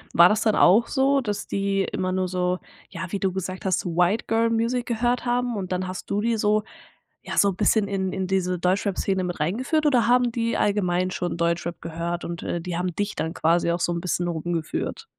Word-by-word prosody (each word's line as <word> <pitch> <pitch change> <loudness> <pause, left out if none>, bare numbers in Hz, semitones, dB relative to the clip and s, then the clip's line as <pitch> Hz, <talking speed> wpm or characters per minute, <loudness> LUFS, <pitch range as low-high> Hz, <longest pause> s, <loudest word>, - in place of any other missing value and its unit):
war 170 +1 +9
das 215 +4 +1
dann 220 -2 +2
auch 210 +7 +5
so, 275 0 +2
dass 205 -4 -3
die 195 0 0
immer 185 0 -1
nur 185 0 0
so 180 0 0 0.3
ja 180 0 -5
wie 200 - -2
du 190 -1 0
gesagt 185 0 -5
hast 185 -2 +2
so 170 -2 -4
White 180 +5 +2
Girl 225 +1 +2
Music 235 +2 0
gehört 240 +1 0
haben 245 -1 0
und 190 -3 -4
dann 185 0 -1
hast 185 - -7
du 205 - 0
die 230 0 +1
so 210 0 +2 0.6
ja - - -6
so 200 - +5
'n 190 - -3
bisschen 210 +1 +2
in 190 -2 -2
in 190 -1 -2
diese 185 -1 0
Deutschrap 190 +2 0
Szene 190 -1 0
mit 175 -2 -4
reingeführt 255 - 0
oder 250 -6 +3
haben 245 0 +3
die 230 0 -1
allgemein 185 -3 +1
schon 175 -2 -3
Deutschrap 170 0 -1
gehört 170 +1 -4
und, 170 -1 -5
äh, 175 - -2
die 180 0 -4
haben 180 -1 -2
dich 205 +1 -2
dann 160 - -3
quasi 170 +1 +2
auch 170 - -1
so 175 - 0
'n 170 - -3
bisschen 175 -1 -1
rumgeführt? 165 -1 -3
190 Hz, 225 wpm, -24 LUFS, 175-220 Hz, 0.6 s, war